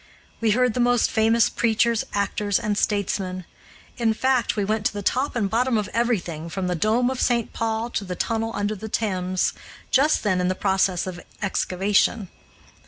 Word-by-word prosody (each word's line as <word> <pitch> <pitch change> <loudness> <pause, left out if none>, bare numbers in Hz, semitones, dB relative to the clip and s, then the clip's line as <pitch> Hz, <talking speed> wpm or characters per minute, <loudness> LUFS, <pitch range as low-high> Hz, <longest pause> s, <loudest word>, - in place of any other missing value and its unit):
We 230 - +1
heard 250 -2 +3
the 250 - -3
most 245 0 +3
famous 225 +1 +3
preachers, 235 0 +1
actors, 205 0 0
and 210 -1 -1
statesmen. 190 -3 -1 0.5
In 225 -2 +1
fact, 260 0 +1
we 205 -2 0
went 215 +1 -1
to - - -5
the 205 -1 -5
top 260 +7 0
and 215 -4 +1
bottom 235 +3 +1
of 210 -2 -2
everything, 180 -9 -1
from 190 +2 -3
the 180 - 0
dome 220 +9 +1
of 260 - -3
St. 235 -2 +1
Paul 225 +1 -2
to - - -2
the 180 -2 -5
tunnel 225 +4 -1
under 205 +1 -1
the 220 +2 -7
Thames, 185 -4 0 0.4
just 290 +4 +3
then 185 -4 +1
in 180 - +1
the 185 - 0
process 190 -2 +1
of 180 -2 -6 0.2
excavation. 195 +1 +1
215 Hz, 180 wpm, -23 LUFS, 190-235 Hz, 0.5 s, heard